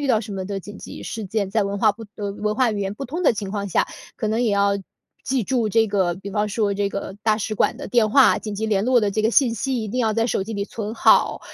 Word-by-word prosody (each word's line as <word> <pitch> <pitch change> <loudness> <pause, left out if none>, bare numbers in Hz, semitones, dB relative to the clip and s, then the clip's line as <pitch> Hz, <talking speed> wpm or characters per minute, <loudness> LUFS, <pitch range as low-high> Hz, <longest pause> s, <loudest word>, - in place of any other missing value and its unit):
遇 285 - -2
到 220 -3 +3
什 215 -2 -7
么 190 -1 -4
的 195 +1 -4
紧 205 +2 -10
急 - - -9
事 220 -2 -5
件， 200 0 -1
在 215 +1 +1
文 200 0 -2
化 215 0 +4
不 225 - -12
的 205 -1 -3
文 210 +1 -2
化 245 -3 +3
语 205 - -3
言 195 0 -2
不 240 +7 -6
通 320 +8 -4
的 295 - +5
情 205 -3 -5
况 200 -1 -3
下， - - +1 0.3
可 - - -2
能 220 +3 0
也 235 - +2
要 200 0 +2 0.5
记 260 -4 0
住 240 -1 0
这 225 +1 +3
个 190 -4 0
比 200 +1 -8
方 210 0 0
说 205 -1 0
这 200 0 0
个 200 -1 -5
大 215 -1 +2
使 215 0 -3
馆 225 - +1
的 285 - -7
电 225 -3 +2
话， 270 +2 +6
紧 210 -2 -5
急 220 +2 -2
联 205 -1 +1
络 250 -1 +4
的 210 - +1
这 215 - 0
个 220 - +3
信 240 -1 +3
息 255 +2 -1
一 - - -4
定 250 +5 -2
要 220 -2 +2
在 230 +1 +1
手 220 - 0
机 220 +4 -6
里 200 -1 -2
存 215 0 -5
好， - - +4
215 Hz, 315 characters per minute, -22 LUFS, 200-230 Hz, 0.5 s, 话